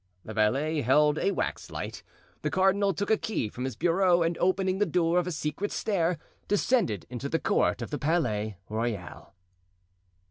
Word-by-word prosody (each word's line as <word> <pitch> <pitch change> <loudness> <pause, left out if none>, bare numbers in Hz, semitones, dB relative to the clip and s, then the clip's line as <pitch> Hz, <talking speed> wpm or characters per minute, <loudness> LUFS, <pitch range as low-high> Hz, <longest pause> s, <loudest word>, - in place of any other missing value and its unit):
The 110 - -6
valet 135 +9 +1
held 150 +4 +3
a 195 - +2
wax - - -3
light; - - -6 0.4
the - - -1
cardinal 195 +1 +3
took 200 +4 -2
a 220 - +5
key 210 - -2
from 125 +4 -5
his 130 -4 -4
bureau 175 - +3
and 165 +1 0
opening 185 +1 +1
the 210 - +2
door 175 0 +2
of 180 - -2
a - - -2
secret 155 +5 -3
stair 180 -5 0 0.3
descended 205 - +1
into 125 +3 -4
the 165 - +1
court - - +1
of - - -7
the 145 - -2
Palais 115 - 0
Royal. 110 -4 -4
165 Hz, 175 wpm, -28 LUFS, 125-190 Hz, 0.4 s, a